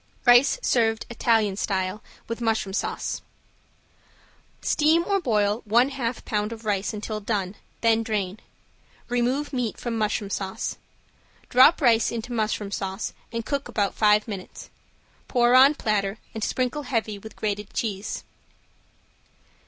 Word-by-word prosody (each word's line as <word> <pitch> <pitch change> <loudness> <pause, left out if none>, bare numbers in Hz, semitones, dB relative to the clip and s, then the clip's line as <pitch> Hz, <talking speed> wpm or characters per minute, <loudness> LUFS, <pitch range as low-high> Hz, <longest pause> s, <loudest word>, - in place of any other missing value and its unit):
~RICE 245 - +6
SERVED 225 -2 +2
IN - - -7
ITALIAN 220 -4 +2
STYLE 190 0 -1 0.3
WITH 230 +1 -5
MUSHROOM 220 -4 0
SAUCE~ - - -2 1.4
Steam 315 +2 +3
or 395 -1 +1
boil 210 -5 +1
one 235 +5 +3
half 255 -3 -4
pound 210 0 -1
of 225 -1 -8
rice 205 -2 0
until 215 0 -4
done, 200 -3 -2 0.3
then 225 -1 +3
drain. 210 -3 -2 0.7
Remove 250 +5 0
meat 245 -4 -2
from 235 -2 -3
mushroom 210 -2 -1
sauce. 190 -1 -3 0.7
Drop 260 +7 +6
rice 235 -4 +4
into 235 +1 -5
mushroom 215 -2 -1
sauce 195 +1 -3 0.2
and 230 -1 -4
cook 280 -1 -2
about 200 -2 0
five 210 +1 +3
minutes. 195 -4 -8 0.6
Pour 240 -1 +3
on 270 +3 +7
platter 205 -4 -1 0.2
and 220 - -4
sprinkle 255 +5 -1
heavy 225 -6 -2
with 220 +2 -11
grated 210 -1 -3
cheese. 205 -3 -3
225 Hz, 135 wpm, -25 LUFS, 205-245 Hz, 1.4 s, on